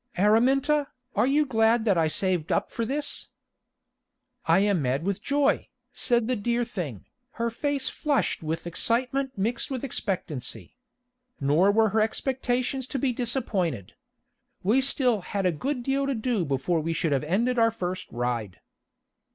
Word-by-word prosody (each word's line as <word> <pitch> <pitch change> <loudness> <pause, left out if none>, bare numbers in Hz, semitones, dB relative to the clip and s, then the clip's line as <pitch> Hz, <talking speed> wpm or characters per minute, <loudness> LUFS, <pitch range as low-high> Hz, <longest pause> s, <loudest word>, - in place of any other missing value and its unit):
"Araminta, 270 +9 +3 0.3
are - - +3
you 295 +2 +3
glad 225 -2 +3
that 200 -4 +4
I 165 -2 +3
saved 180 -1 0
up - - 0
for 230 - -2
this?" 290 +4 -3 1.2
"I - - +5
am 200 -5 +2
mad 135 +3 0
with 195 +1 -2
joy," 285 0 +1 0.2
said 240 -2 +1
the 255 - +1
dear 235 +3 0
thing, 165 - -5 0.3
her 235 0 -1
face 280 +2 -1
flushed 290 -4 0
with 160 +1 -3
excitement 255 - 0
mixed 230 +5 -1
with 265 -2 -4
expectancy. 185 - -4 0.6
Nor 150 +8 +4
were 220 +1 +3
her 215 +2 +2
expectations 255 +2 -1
to 275 - -3
be 260 -1 0
disappointed. 205 - -2 0.7
We 225 +8 +3
still 255 -5 +2
had 195 +2 -3
a 180 - +4
good 250 - -3
deal 275 +2 0
to 275 - 0
do 225 -5 0
before 140 +5 0
we 165 +1 -1
should 165 -1 -1
have 140 -1 +1
ended 230 +10 +1
our 230 0 +5
first 185 -4 -5
ride. 120 -5 -3
225 Hz, 155 wpm, -26 LUFS, 175-260 Hz, 1.2 s, I